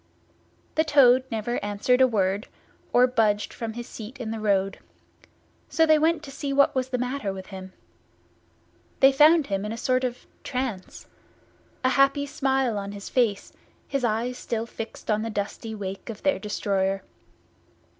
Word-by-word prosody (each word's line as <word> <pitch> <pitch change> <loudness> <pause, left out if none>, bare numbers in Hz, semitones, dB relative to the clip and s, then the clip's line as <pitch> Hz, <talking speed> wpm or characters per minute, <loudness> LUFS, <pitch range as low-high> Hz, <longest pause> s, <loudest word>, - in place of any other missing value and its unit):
The 315 - +2
Toad 260 -4 +5
never 225 +1 -2
answered 205 +5 +1
a 260 - +7
word, 200 -1 0 0.4
or 245 +1 +6
budged 215 -4 +1
from 225 -1 -5
his 240 +1 -6
seat 230 +5 -9
in 225 -3 -4
the 225 - -4
road; 195 -2 +1 0.9
so 325 - +3
they 310 -1 +5
went 320 0 +2
to 280 - -9
see 280 0 -4
what 280 0 +4
was 260 -1 -1
the 255 - -1
matter 250 -4 -2
with 190 -1 -7
him. 190 -1 -9 1.3
They 270 0 +7
found 305 +3 +6
him 195 -3 -2
in 210 - -4
a 225 - -4
sort 255 +2 +1
of 250 -1 -1
a - - -27
trance, 250 -8 -4 0.8
a 255 - +4
happy 275 +2 +3
smile 265 -5 0
on 200 0 -6
his 200 -1 -8
face, 230 -6 0 0.3
his 275 -2 -2
eyes 235 +2 -1
still 230 -1 -3
fixed 225 -1 -6
on 215 0 +1
the 225 - -3
dusty 215 +2 -4
wake 195 0 -6
of 215 -2 -8
their 285 -1 +2
destroyer. 195 -2 -1
235 Hz, 170 wpm, -25 LUFS, 205-265 Hz, 1.3 s, a